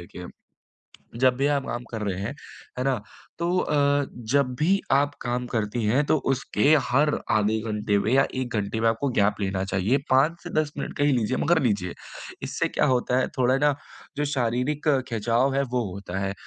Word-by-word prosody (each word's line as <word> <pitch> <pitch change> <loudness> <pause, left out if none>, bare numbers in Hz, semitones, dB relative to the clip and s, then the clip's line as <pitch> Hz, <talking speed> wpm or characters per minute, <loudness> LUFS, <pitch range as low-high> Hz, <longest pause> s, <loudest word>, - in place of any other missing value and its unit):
देखिए, 90 +1 -10 1.0
जब 130 -1 +4
भी 140 +2 +1
आप 140 -2 0
आम 120 0 -4
कर 110 -2 -4
रहे 95 -2 -2
हैं, 110 +7 -3 0.5
है 130 - -1
ना 135 -1 +2 0.4
तो 175 +2 0
अ, 150 - 0 0.6
जब 140 -2 +4
भी 195 +5 +3
आप 145 +1 +3
काम 125 0 -2
करती 110 +1 -1
हैं 130 +8 +2
तो 155 - +3 0.2
उसके 135 +2 +2
हर 145 +4 +3 0.2
आधे 110 +1 +2
घंटे 105 -1 0
में 110 +4 0
या 135 +1 +4
1 130 -2 -3
घंटे 105 +2 -2
में 115 - +3
आपको 115 +5 0
गैप 100 +1 +3
लेना 95 -1 -1
चाहिए 100 +8 +1
5 150 +6 +3
से 175 - -7
10 150 -1 -3
मिनट - - -5
का 145 - +2
ही 145 - +3
लीजिए, 125 +1 0
मगर 175 - +3
लीजिए। 100 -7 0 0.5
इससे - - -1
क्या - - 0
होता 125 0 +1
है, - - +1
थोड़ा 130 +1 +3
ना 145 -1 +3 0.4
जो 150 - +1
शारीरिक 125 +5 -1 0.2
खिंचाव 120 +4 +1
है 140 - +2
वो 125 -2 +1
होता 95 -1 -6
है, 95 0 -1
125 Hz, 195 wpm, -25 LUFS, 105-140 Hz, 1.0 s, जब